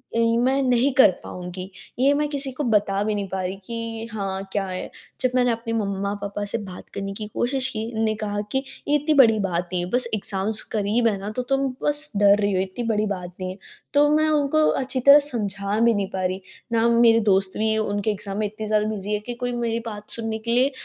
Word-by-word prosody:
उम, 230 Hz, 0 st, +3 dB
मैं 270 Hz, +2 st, +2 dB
नहीं 250 Hz, +1 st, +3 dB
कर 260 Hz, -7 st, +7 dB
पाऊँगी, 180 Hz, +1 st, -7 dB, 0.3 s
ये 275 Hz, +3 st, +4 dB
मैं 300 Hz, -, +1 dB
किसी 280 Hz, -2 st, -2 dB
को 295 Hz, -, -3 dB
बता 205 Hz, -4 st, +2 dB
भी 210 Hz, 0 st, 0 dB
नहीं 200 Hz, -1 st, -2 dB
पा 190 Hz, 0 st, -2 dB
रही 185 Hz, +1 st, -3 dB
कि 230 Hz, 0 st, -5 dB
हाँ, 195 Hz, -2 st, -3 dB
क्या 200 Hz, -1 st, -1 dB
है? 185 Hz, 0 st, -5 dB, 0.3 s
जब 255 Hz, -1 st, +2 dB
मैंने 245 Hz, -1 st, +3 dB
अपने 230 Hz, 0 st, -3 dB
मम्मा-पापा 200 Hz, -1 st, -2 dB
से 205 Hz, -, -1 dB
बात 190 Hz, -5 st, -9 dB
करने 195 Hz, 0 st, -4 dB
की 210 Hz, +1 st, -6 dB
कोशिश 260 Hz, +2 st, 0 dB
की, 220 Hz, -3 st, -4 dB
उन्ने 220 Hz, -1 st, +1 dB
कहा 205 Hz, -1 st, -2 dB
कि, 265 Hz, 0 st, 0 dB, 0.2 s
"ये 295 Hz, -, +3 dB
इतनी 295 Hz, +2 st, +2 dB
बड़ी 230 Hz, -6 st, +6 dB
बात 180 Hz, -3 st, -1 dB
नहीं 180 Hz, -1 st, 0 dB
है, -, -, -8 dB
बस 245 Hz, -1 st, +2 dB
एग्ज़ाम्स 205 Hz, +1 st, 0 dB
क़रीब 220 Hz, +3 st, +2 dB
है 210 Hz, -3 st, +1 dB
ना, 200 Hz, +2 st, -5 dB
तो 250 Hz, -, -2 dB
तुम 270 Hz, 0 st, +2 dB, 0.2 s
बस 295 Hz, +1 st, 0 dB
डर 200 Hz, 0 st, +6 dB
रही 205 Hz, -1 st, +1 dB
हो, 185 Hz, -, +2 dB
इतनी 190 Hz, +5 st, -4 dB
बड़ी 215 Hz, -1 st, +1 dB
बात 180 Hz, -3 st, -5 dB
नहीं 185 Hz, -, -2 dB
है।" 185 Hz, -, -9 dB, 0.4 s
तो 290 Hz, 0 st, +5 dB
मैं 310 Hz, 0 st, +3 dB
उनको 305 Hz, 0 st, +2 dB, 0.2 s
अच्छी 260 Hz, 0 st, -2 dB
तरह 280 Hz, +3 st, +9 dB
समझा 205 Hz, -7 st, -2 dB
भी 235 Hz, 0 st, +4 dB
नहीं 200 Hz, -1 st, -1 dB
पा 190 Hz, -, -2 dB
रही। 185 Hz, +1 st, -2 dB, 0.3 s
ना 225 Hz, 0 st, +3 dB
वो 235 Hz, 0 st, +3 dB
मेरे 230 Hz, -1 st, +6 dB
दोस्त 190 Hz, -1 st, +2 dB
भी 220 Hz, 0 st, +1 dB
उनके 205 Hz, 0 st, 0 dB
एग्ज़ाम 200 Hz, -1 st, -5 dB
में 215 Hz, -, +1 dB
इतनी 215 Hz, +1 st, -7 dB
ज़्यादा 215 Hz, 0 st, +2 dB
बिज़ी 210 Hz, -1 st, -3 dB
है 210 Hz, -, +1 dB
कि 245 Hz, -, -3 dB
कोई 245 Hz, +1 st, -3 dB
मेरी 235 Hz, -1 st, -1 dB
बात 210 Hz, -2 st, -7 dB
सुनने 225 Hz, -1 st, -3 dB
के 230 Hz, +1 st, -3 dB
लिए 255 Hz, +3 st, +3 dB
220 Hz, 235 wpm, -23 LUFS, 200-245 Hz, 0.4 s, तरह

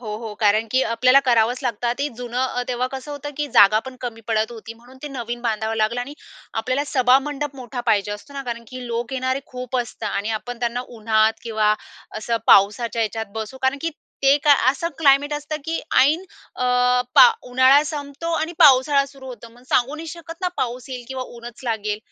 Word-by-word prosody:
हो, 220 Hz, -4 st, -7 dB
हो. 220 Hz, -1 st, -7 dB
कारण 215 Hz, +1 st, +3 dB
की 260 Hz, -, +3 dB
आपल्याला 255 Hz, +4 st, +5 dB
करावंच 240 Hz, 0 st, +3 dB
लागतं. 240 Hz, -1 st, -1 dB
ते 290 Hz, +1 st, 0 dB
जुनं 245 Hz, 0 st, -4 dB
अ, 250 Hz, -1 st, -1 dB
तेव्हा 250 Hz, 0 st, -1 dB
कसं 265 Hz, +2 st, -7 dB
होतं, 290 Hz, 0 st, -6 dB
की 295 Hz, -, 0 dB
जागापण 215 Hz, +6 st, +5 dB
कमी 225 Hz, -2 st, -5 dB
पडत 220 Hz, 0 st, +1 dB
होती. 230 Hz, 0 st, -9 dB
म्हणून 245 Hz, +3 st, -18 dB
ते 295 Hz, -, -5 dB
नवीन 240 Hz, 0 st, -5 dB
बांधावं 220 Hz, -1 st, -1 dB
लागलं. 220 Hz, +3 st, 0 dB
आणि 280 Hz, +4 st, -6 dB, 0.5 s
आपल्याला 260 Hz, +5 st, -1 dB
सभामंडप 275 Hz, +2 st, +2 dB
मोठा 245 Hz, -1 st, -6 dB
पाहिजे 205 Hz, -2 st, +2 dB
असतो 210 Hz, +7 st, -10 dB
ना. 275 Hz, -, -4 dB
कारण 235 Hz, -2 st, -6 dB
की 255 Hz, -1 st, -8 dB
लोक 235 Hz, +2 st, -3 dB
येणारे 260 Hz, +1 st, -1 dB
खूप 255 Hz, 0 st, -5 dB
असता. 230 Hz, -2 st, -4 dB
आणि 215 Hz, +2 st, -4 dB
आपण 245 Hz, +1 st, -8 dB
त्यांना 240 Hz, +1 st, -1 dB, 0.2 s
उन्हात 220 Hz, 0 st, +3 dB
किंवा 215 Hz, -2 st, +1 dB, 0.4 s
असं 230 Hz, +1 st, -1 dB
पावसाच्या 225 Hz, +4 st, +4 dB
ह्याच्यात 220 Hz, -1 st, -4 dB
बसू 220 Hz, +4 st, -6 dB
कारण 265 Hz, +2 st, +1 dB
की 330 Hz, -, -1 dB, 0.3 s
ते 275 Hz, +1 st, +6 dB
काय 290 Hz, -2 st, +7 dB
असं 335 Hz, +5 st, -3 dB
क्लायमेट 285 Hz, -1 st, +4 dB
असतं, 295 Hz, +1 st, -4 dB
की 325 Hz, +1 st, -2 dB, 0.2 s
ऐन 310 Hz, +8 st, +3 dB, 0.3 s
अ, 250 Hz, -, -2 dB, 0.5 s
पा -, -, +9 dB, 0.2 s
उन्हाळा 260 Hz, +3 st, +6 dB
संपतो 295 Hz, +2 st, -5 dB
आणि 325 Hz, +2 st, -2 dB
पावसाळा 275 Hz, +1 st, +6 dB
सुरू 270 Hz, -1 st, -13 dB
होतो. 240 Hz, -2 st, -9 dB
मग 245 Hz, -, -19 dB
सांगू 255 Hz, +4 st, +2 dB
नाही 325 Hz, +1 st, -8 dB
शकत 335 Hz, 0 st, -8 dB
ना, 360 Hz, -, +2 dB
पाऊस 245 Hz, 0 st, -3 dB
येईल 250 Hz, -2 st, -6 dB
किंवा 260 Hz, -1 st, -4 dB
ऊनच 235 Hz, 0 st, -10 dB
लागेल. 215 Hz, -3 st, -2 dB
250 Hz, 195 wpm, -22 LUFS, 225-275 Hz, 0.5 s, पा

